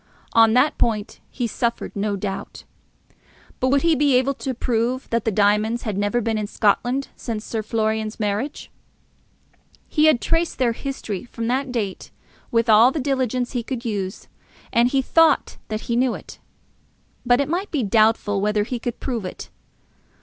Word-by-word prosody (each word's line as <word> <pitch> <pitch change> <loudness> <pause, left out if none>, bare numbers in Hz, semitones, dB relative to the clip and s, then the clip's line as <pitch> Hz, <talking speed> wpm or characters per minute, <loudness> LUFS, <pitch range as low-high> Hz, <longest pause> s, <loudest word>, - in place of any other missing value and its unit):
On 225 -1 +6
that 270 +5 +3
point 215 -3 -1
he 245 - -3
suffered 235 +1 -2
no 205 0 -1
doubt. 195 0 -5 1.0
But 255 - +1
would 275 +1 +2
he 335 -1 +4
be 285 -2 +3
able 260 +2 +2
to 265 -1 -4
prove 240 +2 -1
that 230 -1 0
the 225 - +2
diamonds 210 +3 +2
had 215 -4 -3
never 205 +4 0
been 225 -1 -1
in 210 - -3
Scotland 245 +6 +1
since 220 -3 -5
Sir 225 - -3
Florian's 220 0 -1
marriage? 210 +7 -3 1.2
He 305 -1 +2
had 310 -6 +5
traced 330 +5 0
their 245 -2 +2
history 230 -6 -5
from 230 -1 -6
that 265 +1 -1
date 210 -6 -3 0.4
with 230 0 +1
all 225 +2 +7
the 310 - -3
diligence 255 -3 -1
he 245 - -2
could 245 +1 -5
use, 200 -3 -4 0.5
and 235 +1 +4
he 270 0 +1
thought 325 +2 +3
that 215 0 -3
he 235 - -2
knew 250 0 +2
it. - - -11 0.8
But 245 0 +3
it 280 - +1
might 360 +6 -2
be 290 -6 -1
doubtful 215 -1 +2
whether 210 0 +1
he 240 +3 -4
could 235 0 -4
prove 240 -6 -3
it. 185 - -8
235 Hz, 170 wpm, -22 LUFS, 215-260 Hz, 1.2 s, all